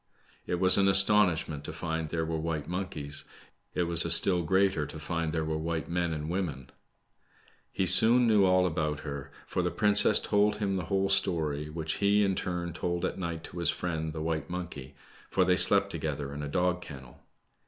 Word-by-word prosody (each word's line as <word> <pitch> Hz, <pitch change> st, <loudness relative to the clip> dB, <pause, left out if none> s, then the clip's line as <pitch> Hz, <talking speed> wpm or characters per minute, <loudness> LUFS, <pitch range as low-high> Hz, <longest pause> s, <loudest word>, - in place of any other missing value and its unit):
It -, -, -1 dB
was 95 Hz, +2 st, +6 dB
an 100 Hz, -, +3 dB
astonishment 95 Hz, -6 st, +3 dB
to -, -, -5 dB
find 80 Hz, -1 st, -5 dB
there 80 Hz, +1 st, -3 dB
were 80 Hz, 0 st, -3 dB
white 80 Hz, -2 st, -4 dB
monkeys. 90 Hz, -6 st, -2 dB, 0.5 s
It 90 Hz, -, 0 dB
was 85 Hz, -1 st, +4 dB
a 85 Hz, -, -3 dB
still 90 Hz, +1 st, +5 dB
greater 95 Hz, -2 st, 0 dB
to 75 Hz, -, -10 dB
find 80 Hz, +1 st, -4 dB
there 80 Hz, -1 st, -2 dB
were 80 Hz, 0 st, -3 dB
white 80 Hz, 0 st, -4 dB
men 85 Hz, -1 st, -1 dB
and 75 Hz, -1 st, -5 dB
women. 80 Hz, -8 st, -5 dB, 1.0 s
He 95 Hz, -, -1 dB
soon 120 Hz, +6 st, +5 dB
knew 105 Hz, -3 st, +3 dB
all 90 Hz, -1 st, +3 dB
about 75 Hz, -3 st, -2 dB
her, 70 Hz, -2 st, -8 dB, 0.2 s
/or -, -, -1 dB
the -, -, 0 dB
princess 105 Hz, 0 st, +4 dB
told 105 Hz, 0 st, +1 dB
him 100 Hz, -2 st, -2 dB
the 90 Hz, -3 st, -3 dB
whole 95 Hz, +3 st, -1 dB
story, 75 Hz, -6 st, 0 dB
which 80 Hz, 0 st, -4 dB
he, 100 Hz, +1 st, +2 dB
in 95 Hz, -1 st, 0 dB
turn, 90 Hz, -2 st, -4 dB
*told 85 Hz, 0 st, -3 dB
at -, -, -4 dB
ni^t 85 Hz, -2 st, -5 dB
to 85 Hz, -, -8 dB
his 85 Hz, -, +3 dB
friend, 80 Hz, -3 st, -3 dB
the 80 Hz, 0 st, -6 dB
white 80 Hz, -1 st, -3 dB
monkey, 85 Hz, -7 st, -8 dB, 0.3 s
for 95 Hz, -, +1 dB
they 90 Hz, 0 st, +2 dB
slept 100 Hz, +1 st, +3 dB
to 85 Hz, -, -5 dB
gether 70 Hz, -2 st, -5 dB
in 70 Hz, -, -7 dB
a 75 Hz, -, -5 dB
dog 90 Hz, +4 st, -1 dB
kennel. 65 Hz, -6 st, -12 dB
85 Hz, 200 wpm, -28 LUFS, 80-95 Hz, 1.0 s, was